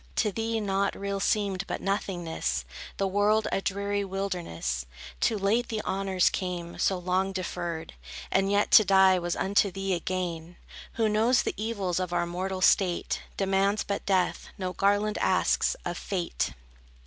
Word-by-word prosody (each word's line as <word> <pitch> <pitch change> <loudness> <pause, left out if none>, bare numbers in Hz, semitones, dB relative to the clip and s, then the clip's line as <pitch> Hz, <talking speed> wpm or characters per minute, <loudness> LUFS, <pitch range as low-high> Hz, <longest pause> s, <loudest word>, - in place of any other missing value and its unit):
To 210 - +1
thee, 225 +2 -1
nought 200 -1 0
real 200 0 -2
seemed 195 -2 0
but - - -3
nothingness, 175 - -2 0.3
The 195 - +1
world 205 +3 +2
a - - 0
dreary 200 +1 -1
wilderness. 175 - -3 0.3
Too 215 - +2
late 210 +5 +1
the 220 -2 -2
honors 190 -1 +1
came, 175 -2 -4
so 190 - +2
long 185 +2 0
deferred; 175 - -4 0.4
And 195 0 +2
yet, 205 0 +2
to 215 - +9
die 190 -1 +5
was 175 0 -2
unto 200 +1 +2
thee 195 0 -2
a 175 - 0
gain. 175 -2 -4 0.4
Who 225 -1 +1
knows 225 +4 +3
the - - -2
evils 200 -5 -2
of 180 -1 -3
our 175 0 +1
mortal 185 +2 -3
state, 185 -1 +2 0.2
Demands 195 +1 +1
but 200 - -3
death, 185 -2 +1
no 185 -1 -3
garland 205 +2 +1
asks, - - +2
of - - -3
Fate. 175 - -2
195 Hz, 160 wpm, -28 LUFS, 180-200 Hz, 0.4 s, to